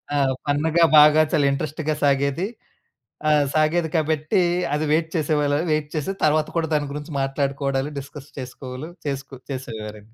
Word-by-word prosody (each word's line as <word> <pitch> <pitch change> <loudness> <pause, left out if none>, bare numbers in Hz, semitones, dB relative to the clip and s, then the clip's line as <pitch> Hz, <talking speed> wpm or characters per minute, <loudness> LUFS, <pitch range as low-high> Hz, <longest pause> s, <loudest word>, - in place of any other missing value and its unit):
ఆ! - - +2 0.3
ఫన్న్‌గా 160 +4 +3
బాగా 150 +1 +8
చాలా 145 - +3
ఇంట్రస్ట్‌గా 155 +2 -2
సాగేది. 140 +5 +1 0.8
ఆహ్, 150 -1 +4
సాగేది 160 +2 +2
కాబట్టీ 155 +2 +1 0.3
అది 150 +1 0
వెయిట్ 160 +1 +2
చేసేవాళా, 150 -2 +1
వెయిట్ 155 -1 0
చేసి 155 +4 -1
తర్వాత 155 0 +3
కూడా 165 -1 +1
దాని 145 -2 0
గురించి 150 +2 -6
మాట్లాడుకోవడాలు, 135 0 -1
డిస్కస్ 140 +1 -10
చేసుకోవలు 130 +3 -7 0.2
చేస్కు 135 -1 -4
చేసేవారండి 110 -4 -7
145 Hz, 135 wpm, -23 LUFS, 140-155 Hz, 0.8 s, బాగా